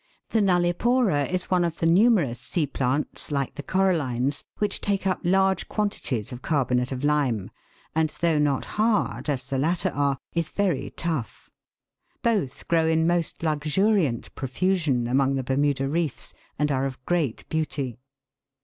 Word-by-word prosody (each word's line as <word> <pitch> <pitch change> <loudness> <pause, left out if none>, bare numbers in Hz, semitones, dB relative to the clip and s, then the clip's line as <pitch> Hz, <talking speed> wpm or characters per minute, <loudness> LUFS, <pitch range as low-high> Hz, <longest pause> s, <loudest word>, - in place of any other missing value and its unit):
The 225 - +2
nullipora 180 - +2
is 185 +1 -1
one 180 -1 +3
of 170 -1 -2
the - - -1
numerous 170 - +4
sea 155 +4 -1
plants, 140 +2 -1
like 140 -2 -1
the - - -6
corallines, 145 -8 0
which 210 - -1
take 200 -1 0
up 185 - +1
large 190 +1 +2
quantities 155 - -2
of 125 0 -7
carbonate 125 -4 0
of 130 0 -4
lime, 140 -9 +1 0.4
and 160 0 +2
though 165 -3 +2
not 145 -2 +1
hard, 215 -6 0
as 130 -3 -1
the 135 -1 -2
latter 165 +5 +1
are, 140 -1 0 0.2
is 170 -2 -1
very 180 -10 0
tough. 155 - -3 0.7
Both 205 - 0
grow 165 -1 +3
in 160 0 +2
most 170 -1 0
luxuriant 155 - +1
profusion 145 -2 0
among 135 +2 +2
the 135 - -1
Bermuda 135 +1 +1
reefs, 160 -1 -1 0.2
and 150 0 +1
are 135 0 +1
of 130 -1 -7
^reat 160 -9 -1
beauty. 140 -6 -2
155 Hz, 150 wpm, -25 LUFS, 135-180 Hz, 0.7 s, numerous